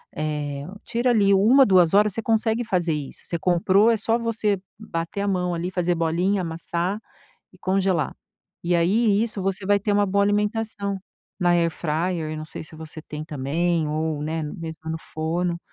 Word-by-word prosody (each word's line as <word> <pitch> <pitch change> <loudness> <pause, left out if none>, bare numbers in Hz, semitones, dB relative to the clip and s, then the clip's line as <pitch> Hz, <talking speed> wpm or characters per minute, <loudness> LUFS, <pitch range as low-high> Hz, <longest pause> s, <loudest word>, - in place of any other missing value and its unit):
eh, 145 -2 -3 0.2
tira 240 +2 +1
ali 200 -4 +4
1, 235 +8 +6
2 180 -5 +4
horas 210 +1 +5
você 225 - -3
consegue 225 +1 +1
fazer 175 -6 0
isso. 145 -3 -6
Você 170 - -2
comprou 185 +5 +4
é 230 - +2
só 225 +2 +1
você 220 -4 0 0.2
bater 200 -2 -4
a 205 - -1
mão 180 -2 0
ali 170 +2 -2
fazer 180 -1 +1
bolinha, 175 +4 +1
amassar 170 +3 -2 0.5
e - - -18
congelar. 185 -4 0 0.5
E 175 +1 +1
aí, 205 +5 +3
isso 220 -3 -3
você 195 0 -2
vai 205 0 +4
ter 205 +1 0
uma 205 0 +3
boa 200 +1 +2
alimentação 205 -1 -1 0.4
na 175 -1 +3
air 170 -1 +3
fryer, 165 0 -2
eu - - -4
não 155 - -5
sei 155 - -8
se 155 - -12
você 160 0 -8
tem 155 0 -7
também 155 +3 0
ou, 155 -1 -1
né, 160 +1 -2
mesmo 160 +1 -6
no 160 - -3
forno 170 +2 -2
180 Hz, 185 wpm, -24 LUFS, 160-205 Hz, 0.5 s, 1